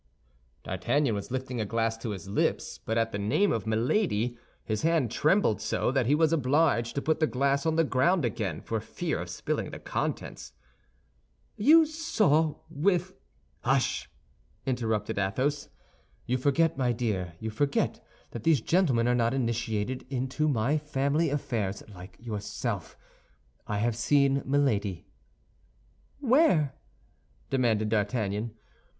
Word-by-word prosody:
D'Artagnan 115 +8 0
was 100 -1 -4
lifting 130 -2 -3
a - - -1
glass 115 +1 0
to 115 - -4
his 95 -3 -6
lips; 100 - -1
but 115 - -1
at 115 0 +1
the 100 - -3
name 145 - +2
of 115 -1 -2
Milady, 120 - +1 0.3
his 110 -1 -2
hand 160 -8 +2
trembled 155 - +2
so, - - 0
that 130 -3 +1
he 145 - +4
was 160 +1 +3
obliged 140 -4 +2
to 140 - -1
put 160 0 +1
the 155 - +3
glass 140 +3 +1
on 160 - +1
the 165 - +4
ground 150 +3 +2
again 100 -8 -2
for 115 - -2
fear - - -3
of - - -5
spilling - - -3
the - - -7
contents." - - -4 1.0
"You 315 +9 +6
saw 310 - +1 0.4
your 175 +5 +3
wi—" 175 - -5 0.5
"Hush!" - - 0 0.6
interrupted 110 -6 -1
Athos. 130 +9 -1 0.6
"You 125 +1 0
forget, 155 +4 +2
my 125 -2 +2
dear, 105 -7 -2
you 110 0 -4
forget 140 +5 0 0.3
that 115 - -6
these 155 +2 +4
gentlemen 140 -10 +2
are 125 - +3
not 120 +1 +1
initiated 115 -1 -2
into 135 +3 -1
my 140 +2 +1
family 150 +2 0
affairs 120 -9 -2
like 90 +1 -12
yourself. 105 -3 -4 0.7
I 105 - -1
have 115 +2 0
seen 140 +3 +3
Milady." 110 -10 +1 1.1
"Where?" 250 - +3 0.8
demanded 115 -5 +2
D'Artagnan. 105 0 -1
125 Hz, 140 wpm, -28 LUFS, 110-150 Hz, 1.1 s, You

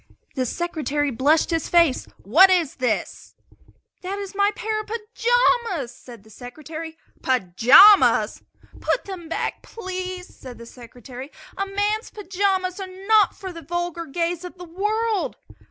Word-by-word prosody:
The 255 -2 -2
Secretary 295 -2 -2
blushed 290 +8 +2
his 325 -2 -1
face. 335 -6 +3 0.2
"What 335 - +6
is 350 -6 +1
this?" 250 -4 -3 0.7
"That 380 +2 -4
is 400 -1 -7
my 400 0 +2
pair 430 0 -2
of 430 - -14
pajamas!" 460 - 0
said 235 -5 -14
the 220 - -19
Secretary. 310 +7 -9 0.2
"Pajamas?" 255 - +5 0.4
"Put - - -1
them 360 -5 -8
back, - - -3
please?" 370 -3 -6
said 250 -2 -11
the 235 - -11
Secretary. 250 +3 -11 0.2
"A 395 - -3
man's 410 +2 -1
pajamas 380 -2 -2
are 385 - -5 0.2
not 435 -2 +4
for 375 -3 -8
the 335 - -9
vulgar 345 +1 -4
gaze 340 +3 -2
of 360 +1 -9
the 355 - -9
world!" 425 +5 -2
350 Hz, 140 wpm, -22 LUFS, 280-400 Hz, 0.7 s, What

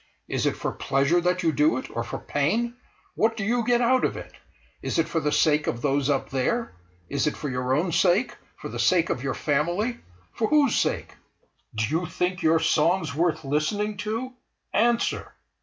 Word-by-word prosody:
Is - - 0
it - - -1
for - - -2
pleasure 140 +6 +1
that 180 +1 0
you 165 - +3
do 150 -2 +2
it, 130 - -6
or 115 - -1
for - - -5
pain? 225 +12 -1 0.4
What 225 +1 +1
do 205 - -2
you 235 +3 +1
get 245 +1 +2
out 255 +2 +3
of - - 0
it? - - -9 0.5
Is - - -2
it 165 -1 +2
for 165 0 -1
the 150 -1 -1
sake 150 0 +3
of 120 - -2
those 140 0 +1
up 140 -2 0
there? 180 - -1 0.3
Is 140 +1 0
it 150 - -2
for 150 - -4
your 125 0 0
own 170 +4 0
sake—for 180 +7 0
the - - -6
sake 170 -3 +3
of 125 - -2
your 135 0 -2
family—for 155 - -2
whose 290 -3 +3
sake? - - -1 0.6
Do 110 0 +1
you 160 +8 -1
think 180 +2 -2
your 160 +1 +4
songs 160 0 +2
worth 165 +1 0
listening 205 +10 0
to? 225 +6 -3 0.4
Answer!" 235 +1 +1
165 Hz, 190 wpm, -25 LUFS, 145-215 Hz, 0.6 s, your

